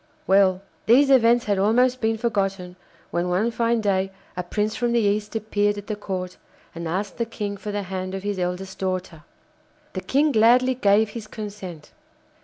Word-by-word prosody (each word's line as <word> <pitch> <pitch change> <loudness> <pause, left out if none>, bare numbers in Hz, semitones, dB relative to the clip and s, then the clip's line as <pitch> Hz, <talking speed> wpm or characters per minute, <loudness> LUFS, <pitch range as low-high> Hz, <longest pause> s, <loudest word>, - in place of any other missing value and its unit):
Well, 190 -1 +3 0.2
these 275 +5 +6
events 240 -2 +5
had 205 -2 +1
almost 245 +5 +3
been 225 0 +1
forgotten 195 -5 -2 0.4
when 175 +1 -1
one 200 +7 +1
fine 230 0 +1
day 195 -2 0 0.2
a 180 - -2
prince 210 +4 -2
from 240 -1 0
the 235 - +3
East 210 0 0
appeared 205 -1 0
at 205 - -7
the 215 - -3
Court 185 -3 -5 0.4
and 170 0 -5
asked 190 +5 -3
the 235 - 0
King 205 -3 -4
for 210 +1 -6
the 205 0 -2
hand 185 0 -4
of 195 - -6
his 205 -2 -2
eldest 180 +2 -4
daughter. 185 -4 -3 0.7
The 185 - -4
King 290 +7 +2
gladly 250 +2 +5
gave 215 -3 +3
his 225 -3 -7
consent. 200 -8 -8
205 Hz, 180 wpm, -23 LUFS, 190-225 Hz, 0.7 s, these